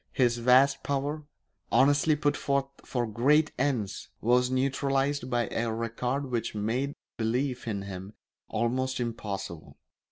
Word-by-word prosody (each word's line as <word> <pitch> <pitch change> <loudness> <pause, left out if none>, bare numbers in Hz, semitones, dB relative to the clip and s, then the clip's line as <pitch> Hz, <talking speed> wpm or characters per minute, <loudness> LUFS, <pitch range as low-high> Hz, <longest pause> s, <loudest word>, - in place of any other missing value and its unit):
His 120 -2 +2
vast 130 +3 +5
power, 145 +2 -2 0.4
honestly 145 +3 +4
put 145 -1 +1
forth 140 -1 0 0.2
for 120 -2 -1
great 140 +8 +3
ends, 130 -8 -1
was 125 +2 +3
neutralised 135 +1 0
by 120 -1 +1
a 115 0 -1
record 125 +4 -2
which 115 -2 -2
made 120 +7 -1 0.2
belief 125 +3 -1
in 100 -3 -2
him 95 +1 -7 0.4
almost 130 +3 0
impossible. 100 -8 -5
125 Hz, 125 wpm, -28 LUFS, 115-140 Hz, 0.4 s, vast